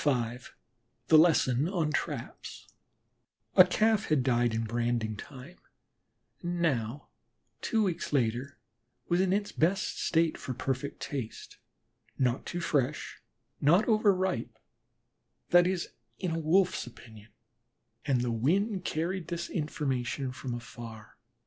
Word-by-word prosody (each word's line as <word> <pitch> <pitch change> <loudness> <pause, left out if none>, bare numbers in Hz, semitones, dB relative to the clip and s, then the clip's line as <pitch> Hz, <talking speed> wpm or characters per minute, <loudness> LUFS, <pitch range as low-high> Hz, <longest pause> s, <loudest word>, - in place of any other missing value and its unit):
V 125 -4 +1 0.7
THE 160 - +8
LESSON 155 -3 +4
ON 170 -5 0
TRAPS - - -4 0.9
A 185 - +11
Calf 215 +3 +2
had 150 -5 +2
died 120 -2 +2
in 110 +1 -1
branding 115 -1 -1
time 135 - -11 0.8
and 175 0 -3
now, 130 -5 -1 0.5
two 220 -1 +1
weeks 180 -5 -2
later, 130 +1 0 0.5
was 175 +1 +3
in 190 -1 +2
its 205 +1 0
best 180 +5 0
state 165 -1 +1
for 130 - -5
perfect 135 +2 -3
taste, 130 -6 -6 0.6
not 125 0 0
too 175 - -3
fresh, 140 -7 -1 0.4
not 175 +9 +4
over 215 -2 +4
ripe 185 -1 -2 0.9
that 175 0 +6
is, 185 -2 -1 0.3
in 180 - -2
a 165 - -1
Wolf's 170 -1 +2
opinion 110 -2 -14 0.7
and 135 -4 +1
the 120 -1 -1
wind 185 - +1
carried 170 +1 -2
this 170 0 -4
information 135 -4 -2 0.2
afar. 115 -2 -10
150 Hz, 125 wpm, -30 LUFS, 120-175 Hz, 0.9 s, A